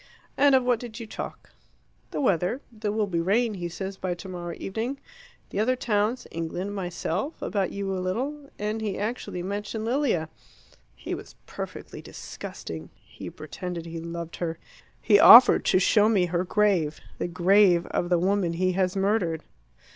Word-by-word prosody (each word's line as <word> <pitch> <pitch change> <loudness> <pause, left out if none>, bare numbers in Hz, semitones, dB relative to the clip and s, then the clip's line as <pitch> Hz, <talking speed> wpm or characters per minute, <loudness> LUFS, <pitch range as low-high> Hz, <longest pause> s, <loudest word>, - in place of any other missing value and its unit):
"And 280 -1 +5
of 260 - +4
what 245 -2 +2
did 235 -1 -8
you 230 - -6
talk?" 215 - -8 0.6
"The - - -4
weather 195 - +1
there 215 -2 -3
will 215 0 +1
be 175 -4 -2
rain, 215 +6 +2
he 175 -3 -4
says, 190 +3 -6
by 185 -2 -2
tomorrow 175 -2 -6
evening 230 +8 -4 0.5
the - - -2
other 250 +4 +2
towns, 230 0 0
England, 170 +4 -4
myself, 190 - -3
about 195 -3 -1
you 200 -1 -3
a 185 - -2
little, 275 +10 -3
and 210 +2 -2
he 205 -3 -2
actually 210 -4 -3
mentioned 205 +3 -4
Lilia. 235 - +1 0.7
He - - -6
was - - -8
perfectly - - -7
disgusting; 80 +1 -8
he - - -10
pretended 170 +2 -6
he 165 0 -6
loved 170 0 -6
her; 165 -2 -3 0.4
he 205 -2 +5
offered 240 +4 +9
to - - +4
show 210 +3 +4
me 195 -5 +3
her 175 0 -1
grave 185 -6 +1 0.2
the - - -1
grave 180 +1 +4
of 175 - -1
the 175 - +4
woman 185 -1 +1
he 185 +2 +1
has 185 0 0
murdered!" 195 -5 0
195 Hz, 165 wpm, -26 LUFS, 175-220 Hz, 0.7 s, offered